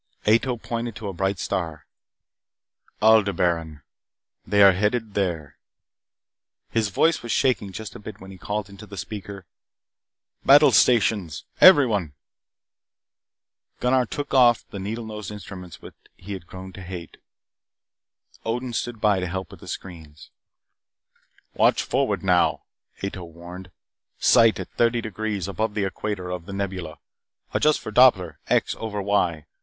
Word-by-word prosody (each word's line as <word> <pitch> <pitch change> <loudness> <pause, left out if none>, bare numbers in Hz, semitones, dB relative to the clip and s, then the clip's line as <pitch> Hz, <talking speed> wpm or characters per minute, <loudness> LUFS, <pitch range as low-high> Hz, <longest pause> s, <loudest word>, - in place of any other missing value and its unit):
Ato 115 +3 +3
pointed 115 0 -4
to 105 -1 -6
a - - -5
bright 95 +2 -1
star. 85 -3 -3 1.2
"Aldebaran. 90 -9 +2 0.6
They 100 -1 +5
are 100 - +9
headed 105 +3 -1
there." 85 -8 -2 1.1
His 110 -2 +1
voice 160 - +2
was 120 - -5
shaking 120 -7 +1
just 110 +2 -7
a - - -8
bit 105 0 -10
when 95 0 -11
he 95 - -12
called 105 +1 -3
into 100 +1 -12
the 100 - -10
speaker: 100 -2 -7 1.0
"Battle 145 +2 +7
stations, 100 - +2 0.2
everyone!" 115 - +6 1.7
Gunnar 125 0 +2
took 145 +3 -5
off 120 -3 +5
for - - -36
the 100 - -6
needle 110 +4 -4
nosed 105 -2 -7
instrument 95 -4 -9
which - - -11 0.2
he 100 +3 -8
had 90 -3 -8
grown 95 +1 -10
to 95 - -10
hate. 90 -3 -8 1.3
Odin 120 +2 -3
stood 115 0 -3
by 105 -3 +3
to 90 - -2
help 95 0 -5
with - - -12
the - - -13
screens. 80 -5 -9 1.2
"Watch - - +3
forward - - -1
now!" - - +2 0.4
Ato 100 -2 -4
warned. 85 +2 -11 0.5
"Sight 115 -2 +4
at - - -7
thirty 120 0 +3
degrees 110 -3 -4
above 105 +2 -2
the 105 -2 0
equator 95 -1 -4
of 90 -1 -6
The 100 - -7
Nebula. 95 -5 -4 0.6
Adjust 155 0 +3
for 110 - -7
Doppler 105 - +4
X - - +1
over 110 -2 -4
Y. 95 -6 0
100 Hz, 140 wpm, -24 LUFS, 90-110 Hz, 1.7 s, are